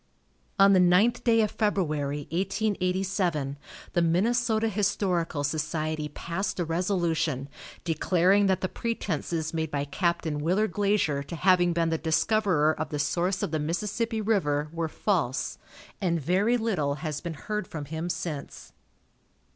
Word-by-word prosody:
On 195 Hz, 0 st, +7 dB
the 185 Hz, -, +5 dB
ninth 185 Hz, +7 st, +4 dB
day 225 Hz, -2 st, +4 dB
of 215 Hz, -, +1 dB
February, 155 Hz, -9 st, 0 dB
1887, 185 Hz, -5 st, 0 dB, 0.4 s
the 175 Hz, -, +2 dB
Minnesota 220 Hz, +6 st, +2 dB
Historical 190 Hz, -7 st, 0 dB
Society 155 Hz, +1 st, -2 dB
passed 180 Hz, +6 st, -4 dB
a 175 Hz, -, +1 dB
resolution, 165 Hz, -5 st, 0 dB, 0.4 s
declaring 180 Hz, +4 st, +3 dB
that 190 Hz, -1 st, +1 dB
the 185 Hz, -, 0 dB
pretenses 170 Hz, -8 st, -3 dB
made 160 Hz, -1 st, -1 dB
by 145 Hz, -1 st, -2 dB
Capt. 170 Hz, +4 st, -1 dB
Willard 165 Hz, +7 st, 0 dB
Glazier 200 Hz, -8 st, +1 dB
to 140 Hz, +5 st, -7 dB
having 180 Hz, +1 st, +4 dB
been 165 Hz, -1 st, +1 dB
the 160 Hz, -1 st, -1 dB
discoverer 160 Hz, -1 st, +2 dB
of 155 Hz, -1 st, -4 dB
the 150 Hz, -, -3 dB
source 175 Hz, +6 st, 0 dB
of -, -, -2 dB
the 155 Hz, -, 0 dB
Mississippi 210 Hz, +8 st, -2 dB
river 150 Hz, -9 st, +1 dB
were 165 Hz, -1 st, -2 dB
false, 160 Hz, -, -1 dB, 0.4 s
and 170 Hz, -3 st, +1 dB
very 195 Hz, -, +2 dB
little 185 Hz, -12 st, 0 dB
has 150 Hz, -1 st, -3 dB
been 170 Hz, -2 st, -5 dB
heard 210 Hz, +5 st, -4 dB
from 150 Hz, -3 st, -6 dB
him 160 Hz, +4 st, -4 dB
since. 155 Hz, -5 st, -5 dB
175 Hz, 140 wpm, -27 LUFS, 155-200 Hz, 0.4 s, On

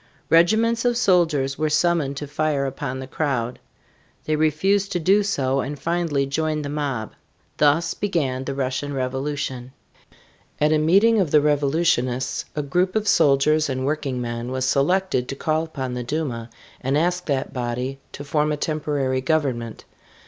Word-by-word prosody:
Regiments 220 Hz, +8 st, +4 dB
of 240 Hz, -1 st, +2 dB
soldiers 160 Hz, -, +2 dB
were 155 Hz, 0 st, +1 dB
summoned 150 Hz, -3 st, +1 dB
to 145 Hz, -, -4 dB
fire 145 Hz, -1 st, -1 dB
upon 135 Hz, -1 st, -4 dB
the 130 Hz, -, -5 dB
crowd. 130 Hz, -4 st, -2 dB, 0.7 s
They 155 Hz, -, +1 dB
refused 190 Hz, +7 st, +1 dB
to 175 Hz, -, 0 dB
do 195 Hz, +5 st, +4 dB
so 135 Hz, -10 st, 0 dB
and 145 Hz, +2 st, -3 dB
finally 165 Hz, -4 st, 0 dB
joined 155 Hz, +2 st, -1 dB
the -, -, -4 dB
mob. 140 Hz, -7 st, -3 dB, 0.5 s
Thus 150 Hz, +3 st, +3 dB
began 140 Hz, -10 st, -1 dB
the 140 Hz, -, -3 dB
Russian 135 Hz, +1 st, -2 dB
Revolution. 130 Hz, -1 st, -3 dB, 0.9 s
At 150 Hz, +1 st, +3 dB
a 155 Hz, -, +3 dB
meeting 200 Hz, +8 st, +4 dB
of 185 Hz, -6 st, +1 dB
the 150 Hz, -, +5 dB
revolutionists 145 Hz, -3 st, +1 dB
a 150 Hz, -, -1 dB
group 180 Hz, +7 st, 0 dB
of 215 Hz, -1 st, 0 dB
soldiers 150 Hz, +1 st, +3 dB
and 130 Hz, 0 st, -2 dB
working 140 Hz, -3 st, -2 dB
men 120 Hz, 0 st, -4 dB
was 130 Hz, 0 st, -1 dB
selected 140 Hz, -1 st, +1 dB
to 135 Hz, -, -3 dB
call 155 Hz, +3 st, 0 dB
upon 130 Hz, -5 st, -5 dB
the 125 Hz, 0 st, -3 dB
Duma 125 Hz, -4 st, -3 dB, 0.3 s
and 135 Hz, +3 st, 0 dB
ask 180 Hz, +3 st, 0 dB
that 135 Hz, -3 st, -1 dB
body 125 Hz, +1 st, -3 dB
to 145 Hz, -, -7 dB
form 150 Hz, +1 st, 0 dB
a 150 Hz, -, -1 dB
temporary 145 Hz, -4 st, -1 dB
government. 130 Hz, -7 st, -1 dB
145 Hz, 160 wpm, -23 LUFS, 130-160 Hz, 0.9 s, the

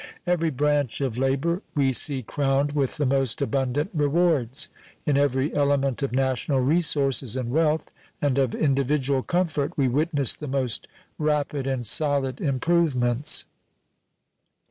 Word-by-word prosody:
Every 175 Hz, -2 st, +1 dB
branch 145 Hz, -2 st, 0 dB
of 130 Hz, -4 st, -2 dB
labor 140 Hz, +7 st, 0 dB
we 135 Hz, -2 st, +2 dB
see 135 Hz, 0 st, 0 dB
crowned 140 Hz, +3 st, 0 dB
with 140 Hz, -1 st, -1 dB
the 150 Hz, -, 0 dB
most 135 Hz, -2 st, +1 dB
abundant 140 Hz, +3 st, -1 dB
rewards. 150 Hz, -3 st, +1 dB, 0.4 s
In 145 Hz, -, +2 dB
every 140 Hz, 0 st, +1 dB
element 140 Hz, -2 st, +1 dB
of 140 Hz, -, -1 dB
national 130 Hz, +1 st, 0 dB
resources 135 Hz, -4 st, +1 dB
and 125 Hz, -2 st, -3 dB
wealth 155 Hz, +1 st, +1 dB, 0.3 s
and 140 Hz, -2 st, +1 dB
of 130 Hz, -3 st, +1 dB
individual 140 Hz, -1 st, +1 dB
comfort 170 Hz, -2 st, -1 dB
we 135 Hz, -2 st, +2 dB
witness 145 Hz, +1 st, 0 dB
the 150 Hz, -, -7 dB
most 130 Hz, -4 st, -1 dB, 0.3 s
rapid 150 Hz, -2 st, -1 dB
and 130 Hz, -3 st, -2 dB
solid 140 Hz, 0 st, +1 dB
improvements. 135 Hz, -3 st, +1 dB
140 Hz, 130 wpm, -24 LUFS, 130-150 Hz, 0.4 s, we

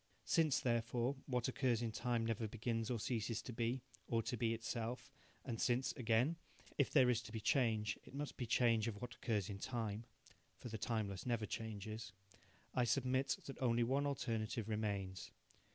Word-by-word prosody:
Since, 160 Hz, -5 st, +4 dB
therefore, 120 Hz, +2 st, +1 dB
what 125 Hz, -3 st, +1 dB
occurs 125 Hz, -3 st, +1 dB
in 115 Hz, -, 0 dB
time 120 Hz, 0 st, 0 dB
never 115 Hz, 0 st, 0 dB
begins 115 Hz, +1 st, -1 dB
or 120 Hz, -2 st, 0 dB
ceases 110 Hz, 0 st, -1 dB
to 125 Hz, -, -6 dB
be, 120 Hz, +2 st, 0 dB, 0.2 s
or 115 Hz, -1 st, +1 dB
to 120 Hz, -, -1 dB
be 115 Hz, 0 st, +1 dB
itself, 115 Hz, +1 st, -3 dB, 0.3 s
and 115 Hz, -4 st, -2 dB
since, 125 Hz, +2 st, +2 dB
again, 125 Hz, +7 st, +2 dB, 0.4 s
if 140 Hz, -, +3 dB
there 130 Hz, -4 st, +6 dB
is 115 Hz, -1 st, +1 dB
to 110 Hz, -, -10 dB
be 110 Hz, -, -3 dB
change 110 Hz, -4 st, +2 dB
it -, -, -12 dB
must 145 Hz, +1 st, -3 dB
be 120 Hz, -, -3 dB
change 115 Hz, -1 st, +4 dB
of 105 Hz, -3 st, -3 dB
what 125 Hz, 0 st, -5 dB
occurs 105 Hz, -7 st, 0 dB
in 100 Hz, -2 st, -5 dB
time 115 Hz, -2 st, -2 dB, 0.5 s
(for 120 Hz, -, -7 dB
the 110 Hz, -1 st, -4 dB
timeless 105 Hz, -3 st, -1 dB
never 115 Hz, -3 st, +1 dB
changes), 110 Hz, 0 st, -5 dB, 0.6 s
I 125 Hz, -, +3 dB
submit 130 Hz, +2 st, +2 dB
that 135 Hz, -, -7 dB
only 120 Hz, -2 st, +3 dB
one 135 Hz, +4 st, +2 dB
alternative 115 Hz, -5 st, -1 dB
remains. 100 Hz, -4 st, -2 dB
115 Hz, 175 wpm, -40 LUFS, 110-125 Hz, 0.6 s, there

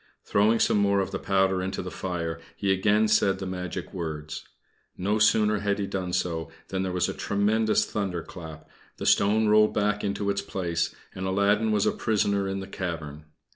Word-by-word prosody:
Throwing 105 Hz, +3 st, +3 dB
some 105 Hz, -, +3 dB
more 100 Hz, 0 st, +3 dB
of 95 Hz, 0 st, -1 dB
the -, -, -3 dB
powder 95 Hz, -1 st, +2 dB
into 95 Hz, +1 st, -3 dB
the -, -, -6 dB
fire, 85 Hz, -3 st, -3 dB, 0.2 s
he 100 Hz, -1 st, 0 dB
again 105 Hz, +3 st, +3 dB
said 105 Hz, -2 st, +3 dB
the 95 Hz, -, -5 dB
magic 90 Hz, 0 st, -5 dB
words. 80 Hz, -4 st, -5 dB, 0.5 s
No 105 Hz, +4 st, 0 dB
sooner 105 Hz, 0 st, +4 dB
had 100 Hz, 0 st, 0 dB
he 100 Hz, -, -1 dB
done 95 Hz, -2 st, -3 dB
so 80 Hz, -3 st, -1 dB, 0.2 s
than 95 Hz, -1 st, -2 dB
there 95 Hz, -1 st, -2 dB
was 90 Hz, 0 st, +1 dB
a -, -, -3 dB
tremendous 110 Hz, +2 st, +1 dB
thunder 95 Hz, -5 st, -3 dB
clap, 80 Hz, -3 st, -10 dB, 0.3 s
the -, -, -5 dB
stone 110 Hz, +2 st, +4 dB
rolled 105 Hz, 0 st, +4 dB
back 105 Hz, 0 st, +1 dB
into 100 Hz, 0 st, -1 dB
its 100 Hz, 0 st, -1 dB
place, 90 Hz, -4 st, -2 dB, 0.2 s
and 95 Hz, 0 st, -4 dB
Aladdin 100 Hz, +3 st, +2 dB
was 105 Hz, -2 st, +2 dB
a -, -, +3 dB
prisoner 100 Hz, -2 st, 0 dB
in 95 Hz, 0 st, -3 dB
the 95 Hz, -, -7 dB
cavern. 80 Hz, -6 st, -5 dB
95 Hz, 190 wpm, -26 LUFS, 90-105 Hz, 0.5 s, sooner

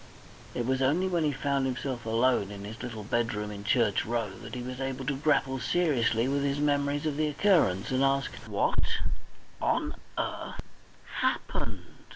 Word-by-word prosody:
It 120 Hz, -, -1 dB
was 130 Hz, +1 st, +1 dB
only 155 Hz, +8 st, +3 dB
when 175 Hz, -3 st, +1 dB
he 150 Hz, -, +2 dB
found 140 Hz, 0 st, 0 dB
himself 130 Hz, -2 st, -3 dB
alone 115 Hz, -2 st, +3 dB
in 100 Hz, -1 st, -7 dB
his 110 Hz, +3 st, -7 dB
little 110 Hz, -4 st, -5 dB
bedroom 105 Hz, -1 st, -1 dB
in 100 Hz, -1 st, -7 dB
Church 105 Hz, -1 st, +3 dB
Row 115 Hz, -3 st, -1 dB
that 115 Hz, 0 st, -8 dB
he 125 Hz, -, -4 dB
was 130 Hz, +1 st, -5 dB
able 135 Hz, 0 st, -3 dB
to 140 Hz, 0 st, 0 dB
grapple 135 Hz, -2 st, +2 dB
seriously 125 Hz, -6 st, +2 dB
with 140 Hz, +1 st, +1 dB
his 140 Hz, 0 st, +1 dB
memories 145 Hz, 0 st, +1 dB
of 150 Hz, -2 st, 0 dB
the 155 Hz, 0 st, +2 dB
occurrence, 145 Hz, -, +3 dB
and 130 Hz, +1 st, +2 dB
ask, 135 Hz, 0 st, +2 dB, 0.2 s
"What -, -, +1 dB, 0.6 s
on -, -, +1 dB, 0.2 s
earth -, -, -3 dB, 0.6 s
happened?" -, -, -1 dB
130 Hz, 170 wpm, -29 LUFS, 115-140 Hz, 0.6 s, only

